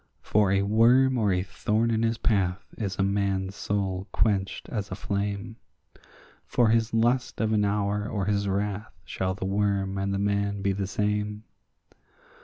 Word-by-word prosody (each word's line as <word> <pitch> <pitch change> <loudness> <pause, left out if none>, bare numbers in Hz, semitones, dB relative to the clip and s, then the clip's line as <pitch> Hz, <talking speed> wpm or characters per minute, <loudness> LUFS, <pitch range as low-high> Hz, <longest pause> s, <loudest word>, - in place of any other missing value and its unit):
For 105 -2 +2
a 100 0 +2
worm 120 +6 +4
or 105 -3 +2
a 90 0 +1
thorn 110 +4 0
in 110 -1 +1
his 115 0 +1
path 100 -2 0
is 100 -4 -3
a 95 - +2
man's 100 -1 0
soul 95 -2 -2
quenched 100 -3 0
as 105 -4 -3
a 95 - -4
flame; 100 +2 -3 0.9
For 120 -2 +3
his 115 0 +2
lust 120 +2 +1
of 110 -1 +1
an 105 -1 +3
hour 105 +1 0
or 100 -3 -2
his 100 0 0
wrath 100 +2 -2
shall 95 0 -2
the 95 - -5
worm 100 0 0
and 100 0 -1
the 100 - 0
man 100 0 0
be 100 - +2
the 95 0 -2
same. 105 +1 -1
100 Hz, 170 wpm, -27 LUFS, 100-110 Hz, 0.9 s, worm